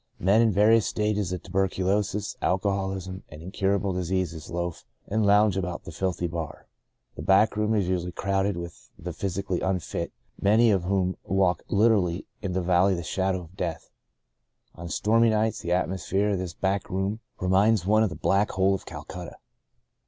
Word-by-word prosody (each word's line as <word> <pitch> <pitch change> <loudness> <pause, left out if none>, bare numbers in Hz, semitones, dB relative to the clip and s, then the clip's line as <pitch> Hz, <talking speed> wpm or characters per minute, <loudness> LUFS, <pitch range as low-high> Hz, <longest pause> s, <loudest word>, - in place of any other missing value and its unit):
Men 100 +5 +4
in 115 -2 +4
various 105 +2 +4
stages 105 -3 -1
of 90 - -4
tuberculosis, 95 +2 0
alcoholism, 95 -1 -1
and 75 - -11
incurable 95 +1 0
dis 90 -2 -3
ease 85 -4 -2
loaf 85 -1 -4 0.2
and 110 +2 0
lounge 105 -1 +5
about 90 -2 -3
the - - -8
filthy 90 -2 -2
bar. 80 -2 -5 0.5
The - - -7
back 100 +3 +4
room 105 +1 +1
is 100 -4 +1
usually 90 -1 -1
crowded 95 +1 -1
with 85 -1 -8
the - - -6
physically 95 -1 -2
unfit, 95 -3 -2 0.3
many 110 +3 +5
of 95 -4 +1
whom 95 -1 0
walk 95 -2 +1
literally 100 -5 +2 0.2
in 95 -2 -3
the 95 0 0
valley 90 +2 +3
of - - -2
the 85 - -4
shadow 95 +3 -1
of 85 +2 -14
death. 85 -4 -4 0.8
On 85 +1 -8
stormy 115 +6 +3
nights, 110 0 +1
the 85 - -4
atmosphere 95 +3 0
of 100 -2 0
this 90 -2 -5
back 100 +1 -1
room 95 +4 -2 0.2
reminds 95 +2 +3
one 110 +2 +4
of 110 - +2
the 85 - -7
Black 100 +2 +2
Hole 95 +1 +2
of 95 - -5
Cal - - -7
cutta. 90 -1 -8
95 Hz, 175 wpm, -26 LUFS, 90-100 Hz, 0.8 s, lounge